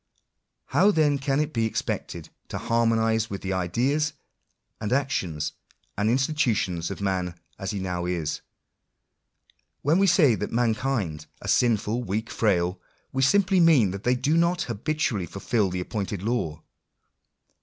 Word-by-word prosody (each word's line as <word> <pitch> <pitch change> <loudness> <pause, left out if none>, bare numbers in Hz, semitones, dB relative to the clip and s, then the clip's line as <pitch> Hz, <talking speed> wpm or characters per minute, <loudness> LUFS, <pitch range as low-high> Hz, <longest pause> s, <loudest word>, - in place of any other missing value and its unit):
How 200 - +4
then 150 -7 +3
can 135 +1 0
it 150 0 -1
be 115 -1 +1
expected - - -4 0.2
to - - -5
harmonise 115 -1 +1
with 100 - -6
the 95 0 -1
ideas, 130 - 0 0.7
and 105 -1 -3
actions, 120 - -1 0.4
and 105 +2 +1
institu 130 0 +2
tions 85 -4 -2
of 100 - -6
man 90 -3 -2 0.2
as 95 - -4
he 105 - -3
now 90 -2 -3
is? 85 -4 -2 1.4
When 155 +6 +3
we 195 - +4
say 160 -8 +5
that - - -3
mankind 115 - -1 0.2
are - - -6
sinful, 115 -1 +2
weak, 110 +2 -3
frail, 90 -4 +1 0.3
we 135 - 0
simply 190 +6 +4
mean 150 - +5
that 100 +1 -6
they 125 +1 +3
do 145 +5 +1
not 170 +1 +2
habitually 115 - -1
fulfil 100 +3 0
the 90 0 -3
appointed 95 -1 -4
law. 105 -9 -2
115 Hz, 145 wpm, -26 LUFS, 95-135 Hz, 1.4 s, say